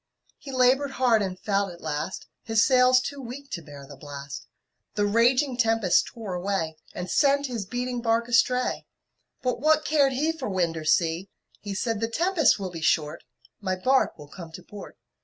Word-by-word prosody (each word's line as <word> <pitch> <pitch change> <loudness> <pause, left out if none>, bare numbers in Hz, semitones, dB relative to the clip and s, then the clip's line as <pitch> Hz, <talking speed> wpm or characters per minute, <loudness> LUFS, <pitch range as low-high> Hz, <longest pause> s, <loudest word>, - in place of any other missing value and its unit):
He 275 - -9
labored 265 +2 +3
hard 240 -4 +3
and 185 -2 -3
failed 200 -2 0
at 170 - -12
last, 155 +3 -4 0.2
His 225 -1 +2
sails 255 -1 +5
too 280 +1 -6
weak 270 +3 -9
to 170 - -4
bear 145 -2 -11
the 140 0 -12
blast, 140 +1 -9 0.5
The 205 -1 +1
raging 245 +5 +2
tempests 225 -6 +3
tore 220 -5 -7
away 180 -3 -2 0.2
And 180 - -4
sent 280 +5 +3
his 235 -7 -4
beating 245 +1 -3
bark 230 0 +1
astray. 250 +1 +1 0.6
But 250 -2 -1
what 310 +2 +3
cared 285 -3 +3
he 300 +5 +1
For 320 -8 -5
wind 175 -4 0
or 160 -1 -6
sea! 165 +3 +1 0.3
He 200 -1 -6
said, 225 +1 -1
"The 225 - +1
tempest 330 +3 +2
will 190 -2 -4
be 165 -2 -7
short, 155 0 0 0.4
My 185 -2 -2
bark 260 +8 +1
will 150 -2 -11
come 165 +1 -10
to - - -10
port." 205 -1 -11
225 Hz, 185 wpm, -26 LUFS, 180-255 Hz, 0.6 s, sails